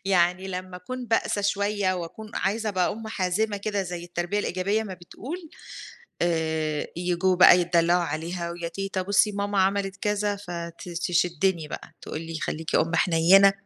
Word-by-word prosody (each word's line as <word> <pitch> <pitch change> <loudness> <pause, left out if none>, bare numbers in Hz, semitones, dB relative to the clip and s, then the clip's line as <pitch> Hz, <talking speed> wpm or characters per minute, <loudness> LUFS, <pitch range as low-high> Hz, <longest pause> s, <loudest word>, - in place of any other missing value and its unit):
يعني 185 0 +2
لمّا 185 0 -5
أكون 250 +7 -6
بأسى 225 -2 +1
شوية 200 -1 +1
وأكون 180 +5 -7
عايزة 215 +3 0
أبقى 185 -3 +1
أم 220 0 -7
حازمة 205 +1 0
كده 200 0 -1
زي 175 -2 -5
التربية 175 +3 -2
الإيجابية 200 +2 0
ما 200 -4 -6
بتقول، 290 - -8 0.7
آآ 160 -3 0
ييجوا 180 +1 +1
بقى 180 0 +8
يتدلعوا 175 0 +3
عليها 170 +2 -3
ويا 170 0 -4
تيتة: 195 +2 -3
"بُصي 200 +2 +3
ماما 200 0 -1
عملت 195 0 0
كذا" 205 0 0
فتشدني 175 -1 -1
بقى، - - -8
تقول 155 - -5
لي: 165 -1 -5
"خليكِ 160 0 -3
أم 165 +2 +2
حنينة." 180 +4 +6
185 Hz, 150 wpm, -26 LUFS, 170-200 Hz, 0.7 s, بقى